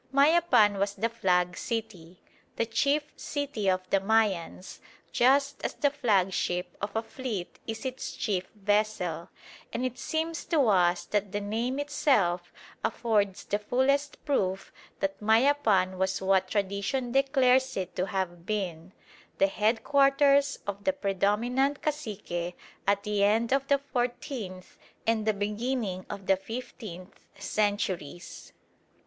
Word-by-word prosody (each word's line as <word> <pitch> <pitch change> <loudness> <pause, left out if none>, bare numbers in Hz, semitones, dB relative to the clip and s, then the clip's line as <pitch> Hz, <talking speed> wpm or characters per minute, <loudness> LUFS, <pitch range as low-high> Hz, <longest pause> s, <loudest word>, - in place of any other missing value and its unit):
Mayapan 275 - +4
was 200 0 0
the 225 +4 0
"flag" 180 -5 +1
city, 185 -7 -5 0.4
the 230 - 0
chief 280 +6 +1
city 280 -9 -2
of 185 0 0
the 195 - +4
Mayans, 195 -4 0 0.3
just 275 +3 +3
as - - -2
the 285 -2 +2
flagship 190 -8 0
of 200 +1 -4
a 225 - 0
fleet 225 -7 -5
is 225 +2 -5
its 260 0 -4
chief 185 -4 -2
vessel; 205 -5 0 0.4
and 245 +2 -2
it 255 -1 -4
seems 320 0 -2
to 295 -7 +2
us 175 -3 +3
that 205 -2 -1
the 205 - -1
name 225 +6 -2
itself 210 - +1 0.3
affords 205 -5 0
the 205 - -1
fullest 275 +6 0
proof 195 -10 -1 0.3
that 195 +1 -2
Mayapan 220 -5 +3
was 190 0 0
what 190 0 +2
tradition 200 +6 -1
declares 265 -1 +3
it 185 -2 -4
to 185 +1 -1
have 180 -3 -3
been, 185 -4 -3 0.4
the - - +5
headquarters 275 +7 +3
of 200 0 -5
the 285 - +2
predominant 240 +5 0
cacique 200 - -3 0.3
at 200 0 +2
the 210 -1 0
end 225 +4 +3
of 275 0 +1
the 280 - +4
fourteenth 245 -7 -4 0.3
and 225 -1 +1
the 215 - +4
beginning 210 -2 -2
of 200 -2 -7
the 195 0 +3
fifteenth 200 -3 -9
centuries. 200 -5 -2
210 Hz, 130 wpm, -28 LUFS, 190-260 Hz, 0.4 s, the